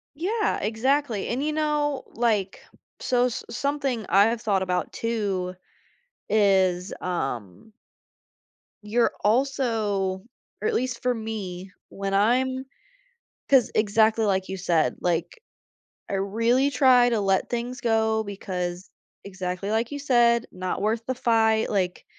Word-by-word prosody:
Yeah, 420 Hz, +7 st, 0 dB
exactly, 230 Hz, +1 st, 0 dB
and 250 Hz, +4 st, -1 dB
you 305 Hz, -, 0 dB
know, 295 Hz, -3 st, 0 dB
like, 215 Hz, -5 st, 0 dB, 0.4 s
so, 250 Hz, -1 st, +2 dB
s 245 Hz, -, -4 dB
something 270 Hz, -4 st, -2 dB
I 200 Hz, +2 st, +5 dB
have 230 Hz, 0 st, -1 dB
thought 195 Hz, -3 st, +1 dB
about 180 Hz, -2 st, -2 dB
too 200 Hz, -6 st, -2 dB, 0.7 s
is, 190 Hz, -3 st, +2 dB
um 135 Hz, -, -4 dB, 1.1 s
You're 225 Hz, +3 st, +1 dB
also 215 Hz, -6 st, 0 dB, 0.4 s
or 440 Hz, -, +1 dB
at 450 Hz, -, 0 dB
least 250 Hz, -, -1 dB
for 250 Hz, -1 st, +1 dB
me, 195 Hz, -5 st, -6 dB, 0.2 s
when 195 Hz, 0 st, -4 dB
I'm 260 Hz, +6 st, +2 dB, 0.8 s
‘cause 265 Hz, -4 st, +4 dB
exactly 220 Hz, +1 st, +3 dB
like 190 Hz, -1 st, 0 dB
you 190 Hz, -, -4 dB
said, 170 Hz, -3 st, +1 dB
like, 175 Hz, -, -2 dB, 0.7 s
I -, -, -5 dB
really 230 Hz, +7 st, +1 dB
try 250 Hz, -2 st, +5 dB
to 230 Hz, -, +1 dB
let 195 Hz, -1 st, +1 dB
things 240 Hz, +1 st, -4 dB
go 220 Hz, -2 st, +1 dB
because 185 Hz, -3 st, -5 dB, 0.3 s
exactly 185 Hz, 0 st, -4 dB
like 225 Hz, +3 st, 0 dB
you 290 Hz, -, -4 dB
said, 240 Hz, -4 st, +3 dB
not 185 Hz, +1 st, -4 dB
worth 220 Hz, +2 st, 0 dB
the 260 Hz, -, -1 dB
fight, 225 Hz, -2 st, +2 dB
like 185 Hz, -3 st, -1 dB
220 Hz, 130 wpm, -25 LUFS, 190-250 Hz, 1.1 s, I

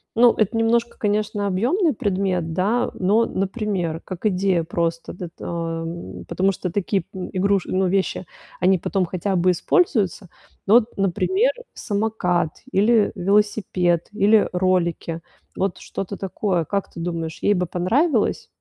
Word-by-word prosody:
Ну, 240 Hz, +1 st, +6 dB
это 215 Hz, +1 st, +1 dB
немножко, 230 Hz, +1 st, +1 dB
конечно, 205 Hz, -1 st, 0 dB
объёмный 270 Hz, -, +1 dB
предмет, 185 Hz, -5 st, -1 dB
да, 215 Hz, +8 st, +1 dB
но, 210 Hz, +5 st, +2 dB
например, 195 Hz, -5 st, -2 dB
как 185 Hz, +2 st, -7 dB
идея 185 Hz, -3 st, +1 dB
просто, 165 Hz, 0 st, -2 dB
д 180 Hz, -, -6 dB
эт 170 Hz, -, -10 dB
ам 165 Hz, 0 st, -5 dB
потому 195 Hz, +1 st, +1 dB
что 180 Hz, -1 st, -4 dB
такие, 195 Hz, 0 st, 0 dB
м 185 Hz, -1 st, -5 dB
игруш 195 Hz, 0 st, +1 dB
ну, 190 Hz, 0 st, 0 dB
вещи, 190 Hz, 0 st, 0 dB, 0.3 s
они 185 Hz, +1 st, +4 dB
потом 185 Hz, +2 st, -1 dB
хотя 190 Hz, +3 st, -2 dB
бы 180 Hz, +1 st, +3 dB
используются. 200 Hz, -, +1 dB, 0.4 s
Ну 210 Hz, -, +6 dB
вот, 240 Hz, -1 st, +3 dB
например, 375 Hz, -, +2 dB, 0.2 s
самокат 200 Hz, -6 st, -1 dB
или 210 Hz, +2 st, +3 dB
велосипед, 190 Hz, -3 st, +1 dB
или 210 Hz, +1 st, +4 dB
ролики. 180 Hz, -2 st, 0 dB, 0.3 s
Вот 195 Hz, -1 st, -1 dB
что-то 195 Hz, +1 st, -5 dB
такое. 190 Hz, -2 st, -1 dB
Как 200 Hz, +5 st, -2 dB
ты -, -, -10 dB
думаешь, 165 Hz, -2 st, -4 dB
ей 205 Hz, -, +3 dB
бы 180 Hz, -1 st, 0 dB
понравилось? 220 Hz, -, +1 dB
195 Hz, 140 wpm, -22 LUFS, 175-210 Hz, 0.4 s, Ну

